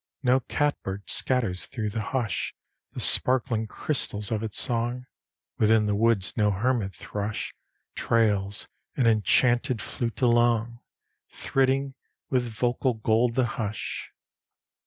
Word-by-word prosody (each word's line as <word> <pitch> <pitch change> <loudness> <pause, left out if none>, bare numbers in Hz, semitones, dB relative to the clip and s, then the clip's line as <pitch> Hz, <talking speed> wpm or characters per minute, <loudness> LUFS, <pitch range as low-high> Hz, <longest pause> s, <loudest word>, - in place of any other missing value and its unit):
No 130 +1 +4
catbird 120 -8 -2
scatters 115 -9 +2
through 110 -5 -4
the 110 - -3
hush 110 -3 -2 0.4
The - - -6
sparkling 120 -3 +2
crystals 105 -5 -2
of 110 -2 -1
its 110 -2 -2
song; 120 +1 -1 0.5
Within 110 0 +4
the 105 - 0
woods 105 -2 +1
no 105 -2 +2
hermit 105 0 0
thrush 105 +1 -4 0.4
Trails 105 -4 0 0.3
an 130 - +2
enchanted 120 +3 +3
flute 115 +2 -4
along, 120 -1 +2 0.5
Thridding 135 0 0 0.4
with 125 -2 +1
vocal 120 +2 0
gold 115 +2 +1
the 130 -2 +3
hush. 110 -3 -4
115 Hz, 115 wpm, -26 LUFS, 105-125 Hz, 0.5 s, No